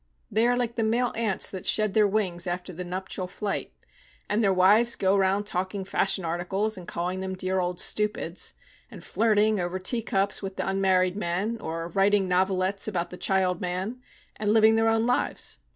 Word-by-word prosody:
They 225 +3 +3
are 245 0 +2
like 240 -1 -2
the 225 - +1
male 235 +3 +1
ants 220 -4 +1
that 190 -2 -7
shed 215 -2 +2
their 215 -1 +4
wings 190 -4 0
after 180 +1 -4
the 180 +2 -5
nuptial 185 +1 -4
flight. 200 +2 -4 0.6
And 210 +2 +1
their 195 - +4
wives 205 +6 +4
go 190 0 +2
round 195 +1 +2
talking 190 0 -3
fashion 190 -1 0
articles, 190 +6 -1
and 180 -2 -10
calling 180 +2 -3
them 190 0 -4
dear 185 0 -1
old 180 0 -2
stupids, 210 -5 -1 0.3
and - - -11
flirting 215 -1 +2
over 175 +1 -2
teacups 200 0 0
with 195 -1 -6
the - - -3
unmarried 190 -1 +2
men, 205 +4 -2
or 165 +1 -4
writing 195 +2 +2
novelettes 185 +2 +1
about 180 -5 -2
the - - -6
child 185 -2 +1
man, 185 +7 -3 0.4
and 210 -1 0
living 220 0 +5
their 225 0 +3
own 225 0 +2
lives. 245 +1 0
195 Hz, 185 wpm, -26 LUFS, 185-215 Hz, 0.6 s, living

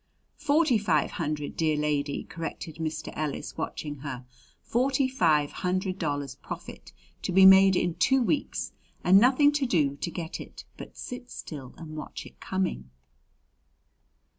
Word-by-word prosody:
"Forty 295 -4 +3
five 165 -8 +1
hundred, 150 -3 -3
dear 155 -2 +1
lady," 145 -1 -1
corrected 160 -1 -6
Mr. 160 -1 -4
Ellis, 155 -2 -3
watching 145 -1 -4
her. 130 -3 -6 0.4
"Forty 265 +2 +1
five 160 - +2
hundred 185 +1 -2
dollars 145 -4 -2
profit - - -9 0.3
to - - -2
be 190 +1 +7
made 190 0 +8
in 175 -1 +1
two 265 +11 +3
weeks, 285 +4 -1 0.3
and 190 +2 +7
nothing 265 +5 +5
to 290 -2 0
do 150 -10 +2
to 170 - -3
get 165 -1 -5
it - - -11
but - - -11
sit 250 0 -7
still 135 -5 -8
and 155 -2 -9
watch 150 - -7
it - - -15
coming!" 185 - -2
170 Hz, 145 wpm, -27 LUFS, 150-215 Hz, 0.4 s, made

